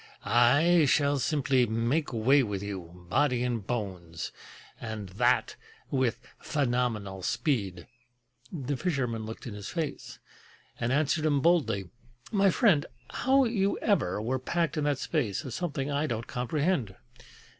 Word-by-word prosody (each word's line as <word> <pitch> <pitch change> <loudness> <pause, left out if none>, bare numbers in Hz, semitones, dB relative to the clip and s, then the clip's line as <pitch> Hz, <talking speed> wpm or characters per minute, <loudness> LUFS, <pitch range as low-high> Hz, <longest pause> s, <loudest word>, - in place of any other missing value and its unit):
I 145 +8 +5
shall 145 0 +3
simply 130 -3 +2
make 115 +8 0
way 130 +5 +4
with 100 -5 -3
you, 90 -3 -7
body 125 +5 +2
and 120 -5 -2
bones, 90 -8 -4 0.5
And 110 -4 -6
that 95 - +1 0.3
with 130 -4 +1 0.2
phenomenal 120 -8 -1
speed!" 100 - -1 0.7
The 140 -4 -3
fisherman 125 -10 -1
looked 110 - -8
in 120 - -6
his 105 -1 -7
face, 160 -4 -4 0.6
And 120 +1 0
answered 150 +3 +1
him 145 -2 +2
boldly: 140 - +2 0.4
"My 200 -2 +4
friend, 185 - +3 0.2
How 270 +2 +3
you 200 -4 +1
ever 150 - +1
were 125 +5 -1
packed 170 +5 -1
in 150 -2 -1
that 145 -2 +1
space 130 - -1
Is 130 - -5
something 145 -4 -2
I 145 +2 0
don't 115 -3 -3
comprehend. 125 - -1
125 Hz, 135 wpm, -29 LUFS, 110-150 Hz, 0.7 s, I